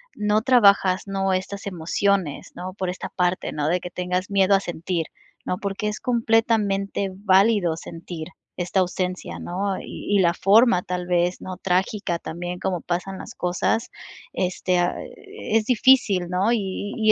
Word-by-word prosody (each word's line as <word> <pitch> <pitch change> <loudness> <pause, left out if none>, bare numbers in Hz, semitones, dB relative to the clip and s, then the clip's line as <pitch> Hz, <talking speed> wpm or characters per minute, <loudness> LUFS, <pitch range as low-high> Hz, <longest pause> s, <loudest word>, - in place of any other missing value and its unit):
no 210 +1 +1
trabajas, 200 -7 +4
¿no? 195 -1 0
Estas 200 +2 -3
emociones, 185 -1 -1
¿no? 185 +1 -6
Por 185 -2 -3
esta 180 - -5
parte, 180 0 -1
¿no? 150 0 -2
De 180 +2 +2
que 180 - -7
tengas 180 +2 -2
miedo 195 0 +4
a - - +3
sentir, 170 -2 -3 0.4
¿no? 180 - -2
Porque 200 +1 -3
es 210 - -5
completamente 220 -5 +1
válido 195 -3 +3
sentir 165 0 -8 0.3
esta 180 +2 0
ausencia, 185 0 -2
¿no? 190 +2 -2
Y 205 - -3
y 190 - +4 0.2
forma 205 -1 +5
tal 180 0 -4
vez, 175 0 +1
¿no? 185 -1 -6
Trágica 185 -1 0
también 175 +2 -5
como 180 -2 -1
pasan 180 +3 -3
las - - -9
cosas, 180 +6 0 0.4
este, 180 0 0
ah, 175 - +1
e 225 - -4
es 215 - 0
difícil, 225 -7 +4
¿no? 190 +6 +2
Y 205 -2 -3
y 220 -1 +4
185 Hz, 160 wpm, -23 LUFS, 180-205 Hz, 0.4 s, forma